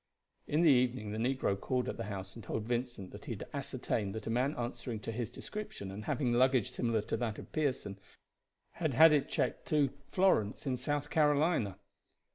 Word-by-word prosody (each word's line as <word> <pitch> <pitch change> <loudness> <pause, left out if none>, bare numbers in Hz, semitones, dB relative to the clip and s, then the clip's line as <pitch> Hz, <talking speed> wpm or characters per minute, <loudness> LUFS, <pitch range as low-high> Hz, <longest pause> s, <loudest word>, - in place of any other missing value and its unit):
In 155 +3 +2
the 160 - +7
evening 125 -4 +2
the 110 - -3
negro 125 -4 +1
called 125 +5 -1
at - - -3
the 115 - -3
house 95 -2 -5
and 115 - -10
told 110 - -3
Vincent 120 -4 -3
that - - -10
he - - -3
had - - -7
ascertained 100 -1 -2
that 110 - -5
a 115 - -2
man 130 +5 +1
answering 120 -1 -4
to 115 - -4
his 115 -1 -3
description 210 - -6
and 105 +2 -7
having 125 -5 +1
luggage 130 -2 +3
similar 115 -3 0
to - - -2
that 115 -3 -2
of - - -10
Pearson 130 -10 -1 0.7
had 155 -7 -2
had 160 +2 +9
it 145 -2 +2
checked - - -1
to 145 -3 +3 0.2
Florence 165 - +2
in 130 -2 0
South 145 +4 -2
Carolina. 150 - +2
125 Hz, 195 wpm, -33 LUFS, 110-145 Hz, 0.7 s, had